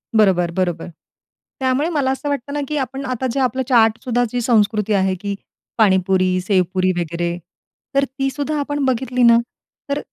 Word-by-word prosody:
बरोबर, 185 -5 +3
बरोबर. 175 -2 -2 0.7
त्यामुळे 265 +4 +1
मला 285 -6 0
असं 270 +2 -3
वाटतं 280 -1 -3
ना, 295 - -1
की 300 - -2
आपण 270 0 -3
आता 255 +1 -2
जे 275 - -2
आपलं 260 0 0
चाटसुद्धा 235 0 +3
जी 245 - -1
संस्कृती 215 -2 +2
आहे 190 -1 +2
की 200 -1 -3 0.4
पाणीपुरी, 190 -3 +3
सेवपुरी 185 -1 +1
वगैरे 170 0 -2 0.6
तर 275 - +4
ती 270 +1 -3
सुद्धा 290 +2 -3
आपण 290 0 -2
बघितली 255 0 0
ना, 235 -1 +7 0.5
तर 280 +1 0
235 Hz, 160 wpm, -19 LUFS, 190-270 Hz, 0.7 s, ना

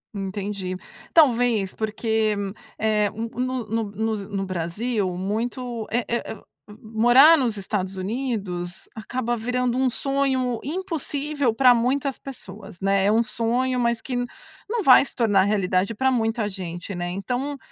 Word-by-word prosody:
Entendi. 195 -1 -4 0.4
Talvez 240 - +4
porque, 220 0 0 0.4
eh, 215 -1 +2
no 240 +3 -3
no 225 +2 -1
no 220 +2 -1
no 200 -1 -4
Brasil 190 +4 -2
muito, 230 +4 -3
eh 235 +1 0
eh 235 - -1
eh - - -11 0.6
morar 245 +8 +7
nos 240 -7 0
Estados 195 -1 -3
Unidos 190 -5 -3
acaba 240 +2 -2
virando 245 +1 -1
um 260 0 +3
sonho 260 -2 0
impossível 295 - -2
pra 250 +1 +6
muitas 260 +3 0
pessoas, 205 -7 -10
né. 195 0 +2
É 205 - +4
um 225 +2 +4
sonho, 240 +3 0
mas 235 -1 +1
que 255 - -4 0.5
não 465 0 0
vai 265 -3 +8
se - - -6
tornar 210 -5 +3
realidade 195 0 +1
pra 265 +4 +2
muita 225 -2 0
gente, 185 -1 -6
né. 175 0 -3
Então, 250 +10 -3
225 Hz, 140 wpm, -24 LUFS, 200-250 Hz, 0.6 s, vai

